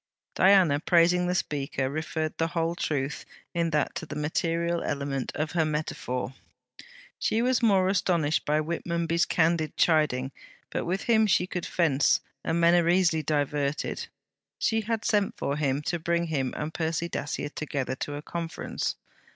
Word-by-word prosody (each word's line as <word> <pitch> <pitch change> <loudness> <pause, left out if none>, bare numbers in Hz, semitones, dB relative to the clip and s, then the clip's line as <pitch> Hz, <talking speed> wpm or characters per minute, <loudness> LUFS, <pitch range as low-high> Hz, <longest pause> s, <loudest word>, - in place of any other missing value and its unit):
Diana, 185 -7 +5
praising 175 +2 +3
the 180 - 0
speaker, 140 -5 -1
referred 155 +2 -3
the 165 - +2
whole 165 0 -1
truth 145 -4 -2 0.3
in 170 -1 +1
that 150 -2 0
to 165 - -6
the - - -6
material 165 +3 0
element 140 -2 -2
of 155 +1 -2
her 165 -1 +2
metaphor. 150 -4 -3 0.9
She 225 +2 +1
was 255 0 +2
more 195 -5 +4
astonished 175 -5 +1
by 150 +1 +1
Whitmonby's 170 +1 0
candid 160 -1 +1
chiding; 145 -5 +2 0.4
but - - -2
with 185 +3 -1
him 220 -2 +4
she 180 -2 +3
could 180 -2 -4
fence, 150 -5 +3 0.2
and 165 +1 0
men 170 0 +5
are 170 -1 +4
easily 175 -3 +3
diverted. 145 -1 -1 0.5
She 225 0 +1
had 220 0 -2
sent 205 -2 +1
for 140 - -1
him, 145 -1 0
to 175 +3 -1
bring 170 +1 0
him 135 -5 -1
and 155 +2 -4
Percy 165 +1 -1
Dacier 145 -3 -3
together 145 -4 -3
to 145 - -4
a 145 - -6
conference. 170 0 -3
165 Hz, 160 wpm, -27 LUFS, 150-175 Hz, 0.9 s, Diana